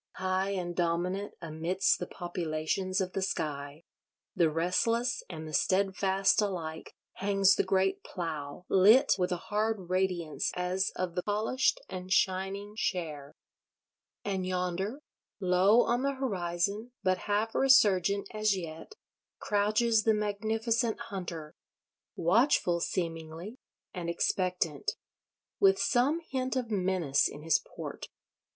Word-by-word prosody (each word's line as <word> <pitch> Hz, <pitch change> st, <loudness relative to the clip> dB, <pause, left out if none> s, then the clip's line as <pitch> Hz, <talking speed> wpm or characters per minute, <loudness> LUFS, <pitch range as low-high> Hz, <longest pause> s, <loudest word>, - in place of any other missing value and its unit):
High 185 Hz, +1 st, -1 dB
and 180 Hz, -3 st, -3 dB
dominant 180 Hz, +4 st, -1 dB
amidst 165 Hz, +4 st, 0 dB
the 180 Hz, -, -4 dB
Populations 175 Hz, +2 st, -2 dB
of 185 Hz, -1 st, -3 dB
the 195 Hz, -, -1 dB
Sky, 145 Hz, -4 st, -3 dB, 0.5 s
the 165 Hz, -2 st, +4 dB
restless 230 Hz, +10 st, 0 dB
and 160 Hz, -3 st, -7 dB
the 155 Hz, -, -8 dB
steadfast 195 Hz, +2 st, +2 dB
alike, 170 Hz, -6 st, -4 dB, 0.2 s
hangs 195 Hz, 0 st, +4 dB
the -, -, +2 dB
great 190 Hz, 0 st, +1 dB
Plough, 160 Hz, -2 st, -5 dB
lit 220 Hz, +9 st, +6 dB
with 180 Hz, 0 st, 0 dB
a 180 Hz, -, 0 dB
hard 210 Hz, -1 st, -2 dB
radiance 180 Hz, -4 st, 0 dB
as 180 Hz, +1 st, 0 dB
of 180 Hz, -2 st, -2 dB
the 180 Hz, -, -1 dB
polished 215 Hz, +6 st, 0 dB
and 185 Hz, 0 st, -7 dB
shining 195 Hz, +2 st, 0 dB
share. 155 Hz, -9 st, -3 dB, 0.9 s
And 195 Hz, -2 st, -1 dB
yonder, 185 Hz, +8 st, -2 dB, 0.4 s
low 190 Hz, +5 st, +4 dB
on 240 Hz, +2 st, 0 dB
the 275 Hz, 0 st, 0 dB
horizon, 200 Hz, -1 st, -2 dB
but 185 Hz, 0 st, +2 dB
half 215 Hz, +2 st, +1 dB
resurgent 200 Hz, -7 st, +4 dB
as 215 Hz, -2 st, +1 dB
yet, 165 Hz, -, -7 dB, 0.4 s
crouches 215 Hz, +2 st, +2 dB
the 220 Hz, 0 st, +3 dB
magnificent 220 Hz, +2 st, 0 dB
hunter: 170 Hz, -5 st, -6 dB, 0.6 s
watchful, 180 Hz, -, +3 dB
seemingly, 165 Hz, +5 st, -4 dB, 0.3 s
and 175 Hz, -2 st, -4 dB
expectant: 170 Hz, -3 st, -1 dB, 0.7 s
with 390 Hz, -1 st, +5 dB
some 285 Hz, +2 st, +2 dB
hint 260 Hz, 0 st, -2 dB
of 245 Hz, -3 st, -2 dB
menace 185 Hz, -8 st, +2 dB
in 145 Hz, -, -9 dB
his 160 Hz, -1 st, +3 dB, 0.2 s
port. -, -, -6 dB
190 Hz, 120 wpm, -30 LUFS, 175-210 Hz, 0.9 s, lit